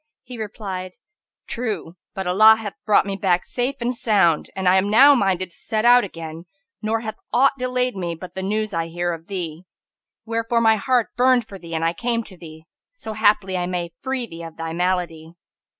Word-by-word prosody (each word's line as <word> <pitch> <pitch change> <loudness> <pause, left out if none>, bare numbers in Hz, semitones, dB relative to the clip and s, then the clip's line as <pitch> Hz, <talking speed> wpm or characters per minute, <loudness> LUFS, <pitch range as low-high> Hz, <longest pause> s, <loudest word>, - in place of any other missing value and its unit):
He 250 -2 -10
replied, 195 -4 -5 0.5
"True! 220 -8 -4 0.2
but 190 - -3
Allah 215 +5 +7
hath 220 -2 -6
brought 210 - +4
me 200 -1 -3
back 180 -2 +1
safe 250 +3 -2
and 240 +1 0
sound, 195 -9 +2
I 185 -1 +3
am 195 +2 +1
now 270 +7 +8
minded 185 -7 0
to - - -19
set 220 0 -2
out 245 +1 +7
again 165 -3 -8 0.4
nor 220 +1 -1
hath 220 -1 -6
aught 270 +3 +4
delayed 250 -1 -1
me 175 -3 -3
but 180 +2 -10
the 190 - -5
news 215 +2 -2
I 165 0 -1
hear 175 +1 -2
of 165 0 -9
thee; 175 -4 -5 0.6
wherefore 230 +1 0
my 225 -1 +4
heart 245 +2 0
burned 250 -2 +3
for 195 - -10
thee 170 -2 -7
and 160 0 0
I 165 - +1
came 230 +4 -1
to 195 - -14
thee, 160 -2 -12 0.3
so 360 - -8
haply 205 -3 +2
I 175 -1 -1
may 175 -2 -3
free 260 -2 -2
thee 170 -6 -10
of 165 -1 -9
thy 165 0 -4
malady." 175 -2 -2
195 Hz, 195 wpm, -22 LUFS, 175-230 Hz, 0.6 s, now